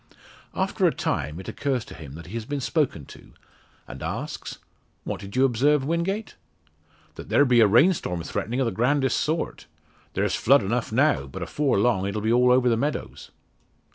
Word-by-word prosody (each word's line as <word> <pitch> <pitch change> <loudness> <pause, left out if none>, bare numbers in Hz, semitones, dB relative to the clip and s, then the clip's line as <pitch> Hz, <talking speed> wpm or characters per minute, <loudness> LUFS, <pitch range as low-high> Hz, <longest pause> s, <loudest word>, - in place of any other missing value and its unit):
After - - +1
a - - +3
time 75 +4 -3
it 95 - -10
occurs 135 -5 -2
to - - -11
him 75 0 -10
he 90 - -11
has 115 -2 -4
been 145 +3 -3
spoken 135 - -1
to - - -15 0.5
and - - -9
asks - - -5 0.5
"What - - -5
did 100 0 -9
you 130 +1 +4
observe, 135 +3 +2
Wingate?" 175 +7 -2 0.8
"That - - -10
there 145 - +4
be 125 -2 +4
a 110 - +7
rain 120 - +5
storm 90 - -4
threatening 115 +9 -3
o' 135 - +2
the 115 - 0
grandest 135 +3 +1
sort. 160 +2 -2 0.5
There's - - 0
flood 135 +1 +4
enough 115 +4 -2
now; 110 - +2
but 65 - -6
afore 145 -6 0
long 100 -3 +2
it'll 100 +2 -2
be 110 +2 +1
all 125 +1 +4
over 125 0 +4
the 120 - +3
meadows." 145 +5 -4
125 Hz, 185 wpm, -25 LUFS, 105-145 Hz, 0.8 s, a